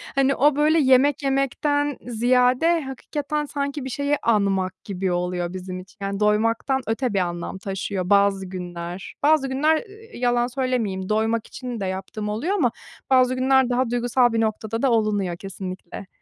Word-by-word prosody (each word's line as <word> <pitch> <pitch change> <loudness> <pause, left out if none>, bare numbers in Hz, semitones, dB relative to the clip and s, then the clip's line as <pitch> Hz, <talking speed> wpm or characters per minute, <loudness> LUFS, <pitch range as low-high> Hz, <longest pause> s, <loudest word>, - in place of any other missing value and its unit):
hani, 275 0 +3
o, 290 +2 +4
böyle, 305 +2 +3
yemek 275 +1 +4
yemekten 280 +1 0
ziyade 250 +7 +3
hakikaten 290 +2 -4
sanki 280 -1 -3
bir - - -4
şeyi 285 +3 0
anmak 195 -4 +1
gibi 190 -2 -2
oluyor 175 0 -2
bizim 185 0 -6
için, 190 +4 -14
yani, 200 0 -3
doymaktan 230 +5 +1
öte 225 +1 -1
bir 195 - +2
anlam 175 0 -3
taşıyor 190 -1 -4
bazı 200 -1 +3
günler. 180 -1 -7
Bazı 300 -2 +4
günler, 300 +4 +3
ııı, 440 +4 -8
yalan 245 0 +1
söylemeyeyim, 240 -7 -2
doymak 220 +1 0
için 250 -3 -6
de 195 - -2
yaptığım 190 +3 -4
oluyor 235 - -1
ama 255 - +2 0.4
bazı 255 -1 +4
günler 260 0 +3
daha 250 0 +1
duygusal 245 0 +2
bir 225 - +1
noktada 220 +1 -2
da 270 - +3
olunuyor, 205 -6 +1
kesinlikle. 190 -1 -7
235 Hz, 160 wpm, -23 LUFS, 195-270 Hz, 0.4 s, o